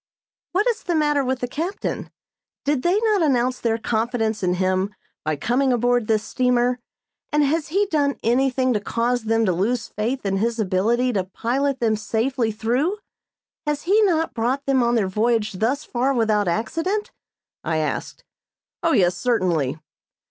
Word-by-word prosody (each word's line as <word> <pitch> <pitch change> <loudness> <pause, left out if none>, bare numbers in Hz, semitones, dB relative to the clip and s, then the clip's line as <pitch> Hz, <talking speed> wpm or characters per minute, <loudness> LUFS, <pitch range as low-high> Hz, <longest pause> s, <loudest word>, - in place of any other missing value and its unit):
"What 400 +4 +2
is 470 -1 0
the 345 - -1
matter 295 -2 +2
with 260 -1 -2
the 245 - -1
captain? 335 +10 -4 0.6
Did 285 -2 +1
they 355 +7 +2
not 430 -4 +2
announce 255 -4 +1
their 225 -1 0
confidence 225 -1 -1
in 180 -1 +1
him 185 +2 0 0.3
by 155 0 0
coming 250 - +1
aboard 245 -1 +2
this 215 -1 +2
steamer, 250 0 +1 0.5
and 300 -1 +3
has 305 +2 0
he 395 +6 +1
done 290 -7 +1
anything 255 +2 +2
to 210 - +1
cause 235 +3 -1
them 225 0 +2
to 185 - +2
lose 225 +7 -1
faith 235 +4 -3
in 195 0 0
his 230 +3 0
ability 225 +5 +1
to 190 -3 0
pilot 260 +8 -1
them 225 -2 +2
safely 225 +2 -1
through? 245 - 0 0.7
Has 295 -1 -1
he 405 +5 +4
not 330 -6 +2
brought 255 +5 -1
them 270 -2 +3
on 240 0 +2
their 210 -5 +2
voyage 215 +2 +1
thus 245 +10 0
far 260 +1 0
without 215 -4 +2
accident?" 345 - -1 0.5
I 160 - -1
asked. 155 -1 -3 0.6
"Oh, 330 - +2
yes, 180 -2 +3
certainly." 175 - 0
245 Hz, 165 wpm, -22 LUFS, 220-280 Hz, 0.7 s, he